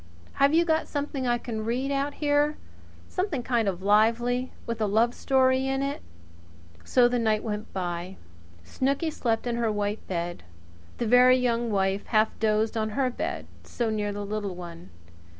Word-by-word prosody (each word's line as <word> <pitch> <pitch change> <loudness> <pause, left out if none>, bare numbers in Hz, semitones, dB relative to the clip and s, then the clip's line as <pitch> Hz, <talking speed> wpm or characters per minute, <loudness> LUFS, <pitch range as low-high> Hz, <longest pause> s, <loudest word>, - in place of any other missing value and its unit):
Have 280 +1 +6
you 335 +2 +4
got 320 -1 +1
something 285 -3 -3
I 240 0 +2
can 225 -2 -5
read 250 +5 -1
out 280 +1 -1
here 295 0 +1 0.5
something 365 -9 -2
kind 235 -4 +1
of 185 -1 -2
lively 235 +5 +2
with 230 -1 -4
a 215 - +2
love 225 +4 +2
story 260 0 +2
in 270 0 0
it?" 280 +1 -3 0.8
So 250 -1 +4
the 245 0 0
night 215 -2 +1
went 210 -1 -4
by. 180 0 -4 0.5
Snooky 275 - -1
slept 230 -6 -1
in 240 -1 -1
her 235 -1 +1
little 210 - -2
white 205 +1 -2
bed. 175 -1 -3 0.6
The 235 - -1
Very 250 +2 +6
Young 240 -2 0
Wife 195 -1 0
half 215 0 +3
dozed 215 0 +1
in 220 -1 0
her 255 +3 0
bed, - - -4 0.2
so 235 -2 -2
near 210 -1 -1
the 205 0 -5
little 205 -2 -3
one. 175 -1 -9
235 Hz, 175 wpm, -26 LUFS, 210-260 Hz, 0.8 s, Have